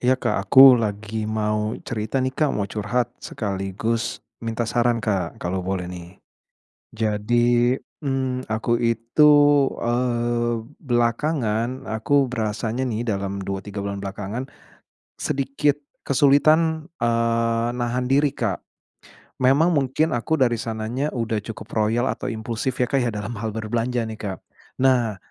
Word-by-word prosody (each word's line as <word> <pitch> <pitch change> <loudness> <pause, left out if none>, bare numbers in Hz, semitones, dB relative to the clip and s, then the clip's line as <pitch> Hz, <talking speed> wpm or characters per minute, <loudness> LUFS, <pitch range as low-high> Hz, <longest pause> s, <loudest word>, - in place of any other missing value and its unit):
Iya 130 +1 +3
Kak, 100 -6 -2
aku 130 0 +9
lagi 110 0 -3
mau 105 0 -1
cerita 110 +2 -3
nih 130 - -1
Kak, 150 +1 +1
mau 100 - 0
curhat 110 +4 -2
sekaligus 100 +2 -3 0.2
minta 115 0 -2
saran 120 +1 +1
Kak 100 -6 -2
kalau 90 +2 -3
boleh 95 0 -2
nih. 90 +1 -10 0.7
Jadi, 120 +3 +2 0.2
mmm, 130 -3 -2
aku 115 +2 0
itu, 115 +6 +4 0.5
eee, 120 0 0 0.3
belakangan 120 -1 0
aku 135 +6 +1
berasanya 115 0 -2
nih 115 -1 -2
dalam 100 -3 -2
2, 95 -1 -3
3 100 0 -6
bulan 100 0 -4
belakangan 105 +6 -5 0.7
sedikit 140 +1 0 0.2
kesulitan, 155 +3 +3
eee, 115 -1 +1
nahan 125 +1 -1
diri 140 +1 +3
Kak. - - -3 0.8
Memang 140 +7 +4
mungkin 145 +1 +1
aku 125 +7 0
dari 120 -5 +2
sananya 115 +5 -3
udah 115 -2 -1
cukup 110 +2 -9
royal 110 +3 +1
atau - - -5
impulsif 115 +2 -3
ya 125 - +2
Kak 135 +2 0
ya 120 - +1
dalam 105 0 -4
hal 110 - -2
berbelanja 115 +2 -1
nih 110 -1 -7
Kak. 95 -3 -4 0.5
Nah 120 -5 +3
115 Hz, 135 wpm, -23 LUFS, 110-130 Hz, 0.8 s, aku